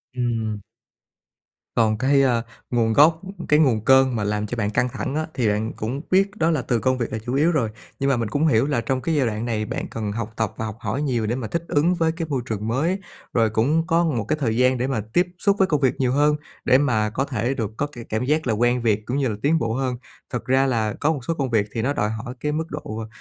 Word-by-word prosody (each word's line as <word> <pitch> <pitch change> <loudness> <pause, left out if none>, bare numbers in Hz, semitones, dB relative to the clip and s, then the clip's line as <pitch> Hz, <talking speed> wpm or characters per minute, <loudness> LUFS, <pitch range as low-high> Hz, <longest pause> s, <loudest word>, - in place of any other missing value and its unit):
Ừm. 115 -4 -1 1.1
Còn 110 -2 +3
cái, 135 +3 +3
a, 120 -3 +2 0.3
nguồn 115 -2 +2
gốc, 160 +5 +5 0.3
cái 150 - +5
nguồn 115 -8 +2
cơn 130 -1 +5
mà 110 - -1
làm 105 +1 -1
cho 120 - -4
bạn 105 -2 0
căng 125 +4 +1
thẳng 135 - -4
á, 155 +1 0
thì 120 -4 0
bạn 105 +2 0
cũng 125 +6 -4
biết 195 +2 +4
đó 165 -3 +2
là 155 -5 +1
từ 120 0 0
công 130 +2 +1
việc 120 - -3
là 110 - -2
chủ 120 +3 -5
yếu 155 +5 +3
rồi. 135 -9 +1 0.3
Nhưng 135 - +1
mà 135 - +2
mình 115 -2 -2
cũng 145 +8 +1
hiểu 120 -3 +3
là 140 -6 0
trong 130 +3 -1
cái 165 +3 0
giai 140 -3 +2
đoạn 110 +1 -3
này 110 -3 -1
bạn - - -4
cần 110 -2 -4
học 110 0 -4
tập 110 -3 -1
và 110 - -3
học 110 -2 -5
hỏi 135 - -2
nhiều 125 -6 0
để 115 - 0
mà 125 -4 -4
thích 170 +9 -2
ứng 165 +5 +2
với 165 -1 +1
cái 165 0 -4
môi 135 -4 -1
trường 110 -3 -3
mới. 155 - 0 0.3
Rồi 115 -2 +3
cũng 145 +10 +1
có 165 +1 +3
một 125 -9 0
cái 155 - 0
thời 115 -4 0
gian 125 +1 +3
để 125 +2 -1
mà 130 -5 -1
tiếp 175 +1 +3
xúc 200 -1 +3
với 190 - +4
công 150 -4 0
việc 130 -3 +2
nhiều 130 -2 +2
hơn, 145 +2 +3 0.3
để 130 - +6
mà 120 -7 +1
có 130 +6 -1
thể 125 -1 -1
được 110 -6 -3
có 145 - 0
cái 120 -5 -9
cảm 110 +2 -1
giác 155 +1 +1
là 115 - +2
quen 120 +3 +2
việc 110 -2 +1
cũng 125 +4 -2
như 140 -2 +1
là 110 - -2
tiến 160 +3 +3
bộ 115 -4 -1
hơn. 130 0 -1 0.3
Thật 125 - -4
ra 130 +1 +3
là 110 -5 0
có 150 - +1
một 145 - -4
số 165 - 0
công 140 -5 -2
việc 110 -3 +2
thì 115 - -1
nó 135 +5 0
đòi 105 -6 0
hỏi 115 +3 -5
cái 150 - -1
mức 160 +2 -1
độ 110 -7 -5
125 Hz, 275 wpm, -23 LUFS, 110-145 Hz, 1.1 s, để